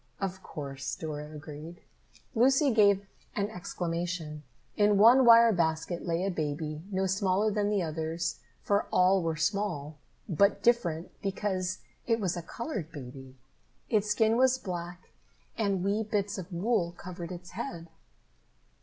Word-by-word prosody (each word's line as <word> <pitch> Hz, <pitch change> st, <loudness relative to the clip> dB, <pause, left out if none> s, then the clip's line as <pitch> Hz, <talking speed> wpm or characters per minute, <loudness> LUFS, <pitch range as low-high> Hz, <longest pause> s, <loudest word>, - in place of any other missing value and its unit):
"Of 190 Hz, -1 st, -3 dB
course," 135 Hz, -5 st, -5 dB
Dora 150 Hz, -1 st, -6 dB
agreed. 155 Hz, +2 st, -9 dB, 0.5 s
Lucy 265 Hz, +4 st, +4 dB
gave 200 Hz, -3 st, +4 dB, 0.3 s
an 205 Hz, +1 st, -1 dB
exclamation. 170 Hz, -4 st, -4 dB, 0.3 s
In 205 Hz, -1 st, +4 dB
one 240 Hz, +5 st, +7 dB
wire 230 Hz, 0 st, +8 dB
basket 165 Hz, 0 st, -1 dB
lay 170 Hz, +2 st, 0 dB
a 195 Hz, -, 0 dB
baby, 155 Hz, -1 st, -3 dB
no 190 Hz, 0 st, 0 dB
smaller 195 Hz, +2 st, +1 dB
than 205 Hz, 0 st, 0 dB
the 205 Hz, -3 st, +1 dB
others, 160 Hz, +1 st, -3 dB, 0.2 s
for 200 Hz, 0 st, +1 dB
all 185 Hz, +1 st, +4 dB
were 165 Hz, -1 st, -1 dB
small, 160 Hz, -4 st, -2 dB, 0.3 s
but 200 Hz, +2 st, +2 dB
different, 180 Hz, -9 st, +1 dB
because 190 Hz, -2 st, -2 dB, 0.2 s
it 230 Hz, -1 st, +2 dB
was 185 Hz, -4 st, -1 dB
a 175 Hz, -, -4 dB
colored 205 Hz, -, -5 dB
baby. 130 Hz, -2 st, -10 dB, 0.6 s
Its 210 Hz, -2 st, +2 dB
skin 220 Hz, +1 st, +3 dB
was 260 Hz, 0 st, +4 dB
black 175 Hz, -4 st, -6 dB, 0.5 s
and 200 Hz, -4 st, 0 dB
wee 200 Hz, +3 st, +1 dB
bits 205 Hz, -1 st, -1 dB
of 185 Hz, +1 st, -8 dB
wool 180 Hz, -1 st, 0 dB
covered 175 Hz, 0 st, -8 dB
its 180 Hz, 0 st, -9 dB
head. 170 Hz, -9 st, -6 dB
185 Hz, 140 wpm, -29 LUFS, 165-210 Hz, 0.6 s, wire